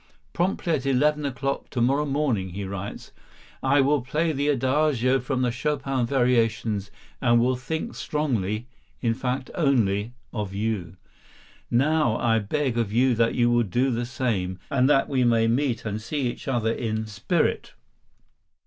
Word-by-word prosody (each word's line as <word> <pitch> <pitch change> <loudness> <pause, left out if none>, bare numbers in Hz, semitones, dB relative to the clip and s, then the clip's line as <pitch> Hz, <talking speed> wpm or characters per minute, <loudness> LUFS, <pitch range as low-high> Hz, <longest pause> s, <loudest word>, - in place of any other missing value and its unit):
"Promptly 175 -1 0
at 140 -3 -1
eleven 145 +2 +2
o'clock 135 +1 -3
to 125 - -3
morrow 135 +5 +2
morning," 135 -10 0
he 100 +2 -4
writes, 100 +1 -6 0.5
"I 135 +1 +4
will 140 +1 +2
play 155 +6 0
the 145 0 -1
Adagio 135 -1 +2
from 130 0 -1
the 125 - +1
Chopin 135 -1 -1
variations 115 -5 +1 0.3
and 120 -2 +4
will 125 +2 +2
think 160 +6 -4
strongly—in 120 -3 -3
fact 130 +2 -3
only—of 110 - -1
you. 100 -5 -2 0.7
Now 140 -1 +2
I 115 -1 +2
beg 120 +3 -1
of 110 -4 -1
you 125 +3 +3
that 115 0 +1
you 120 -1 +3
will 120 0 +4
do 120 +5 +1
the 120 0 -2
same, 110 -8 -2
so 130 -2 +2
that 135 -1 +4
we 130 -3 +1
may 115 -2 +3
meet 120 -1 0
and 105 0 -3
see 145 +7 -3
each - - -12
other 120 -4 +1
in 110 -2 -2
spirit. 100 -2 -1
125 Hz, 150 wpm, -25 LUFS, 115-140 Hz, 0.7 s, I